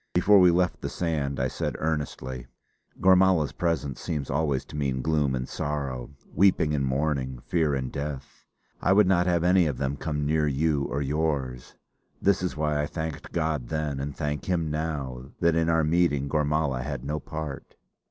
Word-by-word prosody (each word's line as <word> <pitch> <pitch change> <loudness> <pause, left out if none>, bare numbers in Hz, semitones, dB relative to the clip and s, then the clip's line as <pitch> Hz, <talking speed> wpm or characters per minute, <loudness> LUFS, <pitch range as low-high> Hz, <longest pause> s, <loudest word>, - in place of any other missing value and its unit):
Before 100 +3 +6
we 90 -1 +7
left 90 +1 +1
the - - -3
sand, 75 -5 -2
I 65 - +1
said - - -3
earnestly: 65 -5 -3 0.5
"Gormala's 95 -4 +4
presence 70 -7 -2
seems 75 -4 -3
always 70 -2 0
to - - -11
mean 65 -3 -1
gloom 75 -4 +1
and 65 0 -3
sorrow, 70 -4 -3 0.2
weeping 90 -4 +3
and 70 -2 0
mourning, 65 -1 -1
fear 80 -4 +1
and 65 -1 -3
death. 70 -1 -6 0.3
I 95 - +4
would 105 +1 +6
not 90 -1 +3
have 85 -2 +2
any 90 -1 +4
of 70 -5 -2
them 70 +1 -2
come 75 -2 -2
near 75 0 +2
you 75 0 +1
or 70 +2 -2
yours. 70 -4 -2 0.4
This 100 -1 +2
is 90 -3 -2
why 75 -1 +1
I 75 - -1
thanked 80 -2 -5
God 80 -6 -1
then, 75 -3 -2
and 70 +1 -4
thank 75 -1 -2
Him 85 -4 0
now, 75 -5 -3
that 85 -1 +3
in 80 0 +2
our 80 -1 +3
meeting 75 -3 +2
Gormala 75 -3 0
had 70 -1 -5
no 75 +2 -2
part!" 75 -4 -7
75 Hz, 180 wpm, -26 LUFS, 70-80 Hz, 0.5 s, we